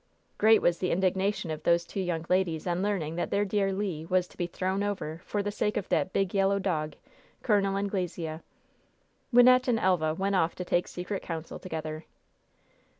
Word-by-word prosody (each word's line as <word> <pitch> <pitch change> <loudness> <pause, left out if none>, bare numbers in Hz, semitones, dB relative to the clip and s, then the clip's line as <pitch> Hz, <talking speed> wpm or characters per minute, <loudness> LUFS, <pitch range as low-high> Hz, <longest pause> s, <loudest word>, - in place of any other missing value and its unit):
Great 220 +1 +5
was 170 -1 +2
the 180 - 0
indignation 190 -1 0
of 155 - -4
those 170 0 +2
two - - -6
young 175 -3 -2
ladies 180 -4 +1
on 175 0 0
learning 180 -6 -1
that 175 - -1
their 205 +1 +1
dear 195 -1 +1
Le 190 -5 -3
was 180 0 +2
to - - -19
be 175 - -2
"thrown 190 +3 -2
over" 185 -6 -3
for 205 -1 -2
the 205 - -2
sake 210 +1 -1
of 205 - -3
that 185 - +1
"big, 195 -2 0
yellow 195 0 +3
dog," 155 -6 -1 0.5
Col. 210 -4 +3
Anglesea. 180 -5 -3 0.9
Wynnette 255 +1 +6
and 240 -2 +3
Elva 175 -6 +1
went 195 +3 -1
off 170 -3 +2
to 180 - -5
take 175 0 +1
secret 180 +2 -4
counsel 165 -1 -6
together. 155 -2 -5
185 Hz, 185 wpm, -28 LUFS, 170-200 Hz, 0.9 s, Wynnette